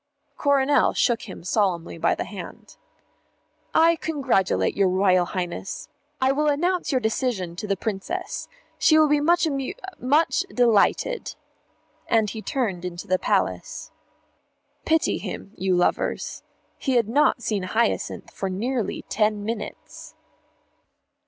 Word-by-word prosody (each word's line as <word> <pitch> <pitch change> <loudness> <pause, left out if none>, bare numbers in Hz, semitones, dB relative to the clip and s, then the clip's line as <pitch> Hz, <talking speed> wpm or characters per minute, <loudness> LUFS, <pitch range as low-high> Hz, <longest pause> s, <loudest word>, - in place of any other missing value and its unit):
Coronel 285 0 +3
shook 230 -3 +1
him 185 - -9
solemnly 180 -4 0
by - - +2
the - - -3
hand. - - -10 1.0
"I 330 +1 +4
congratulate 270 - 0
your 195 -2 +3
Royal 185 -1 +3
Highness. 180 +1 -5 0.3
I 260 0 +3
will 300 +2 +1
announce 345 +5 +1
your 260 - +2
decision 220 -6 -1
to 210 - -5
the 195 -1 0
Princess. 225 - -4 0.3
She 310 - +5
will 310 -1 +6
be 295 0 +3
much 345 +4 +3
amu 275 0 -2 0.3
much 295 +6 +2
delighted." 245 - +2 0.7
And 220 -3 +2
he 220 - -6
turned 215 -9 -2
into 175 -1 -5
the 185 0 +1
Palace. - - -1 0.9
Pity 320 0 +2
him, 195 - -6
you 185 -1 +1
lovers. 175 - 0 0.4
He 265 - 0
had 235 -3 +3
not 245 0 +2
seen 210 -3 -1
Hyacinth 220 +5 -1
for 195 - -3
nearly 220 +3 -2
ten 210 -1 0
minutes. 220 -1 -7
230 Hz, 130 wpm, -24 LUFS, 190-285 Hz, 1.0 s, will